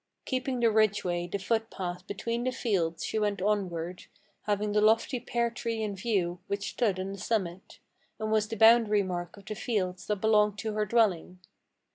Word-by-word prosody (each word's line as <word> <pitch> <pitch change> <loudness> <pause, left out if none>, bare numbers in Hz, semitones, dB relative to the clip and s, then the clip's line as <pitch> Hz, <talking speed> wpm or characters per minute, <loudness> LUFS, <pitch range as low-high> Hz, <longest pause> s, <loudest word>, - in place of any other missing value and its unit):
Keeping 255 -1 -2
the 230 -1 +4
ridgeway, 195 -5 +1
the 200 - -2
footpath, 190 -4 -3
between 230 +4 -3
the 255 - 0
fields 190 -10 -1
she 220 - -1
went 205 -2 0
onward, 185 -4 -2 0.4
Having 210 0 0
the 210 0 +2
lofty 225 +4 +3
pear 235 0 -1
tree 230 -2 -3
in 205 -2 -3
view, 190 -4 -1
which 200 0 -3
stood 205 -6 0
on 190 +1 -3
the 195 - -7
summit, 190 -4 -3 0.4
And 215 0 -2
was 215 -1 +2
the 225 0 -5
boundary 220 -2 +6
mark 175 0 -5
of 200 - -14
the 215 - -4
fields 185 -5 -2
that 210 - +1
belonged 210 0 +3
to 220 +1 -3
her 210 0 0
dwelling. 190 -5 +1
210 Hz, 180 wpm, -29 LUFS, 185-225 Hz, 0.4 s, boundary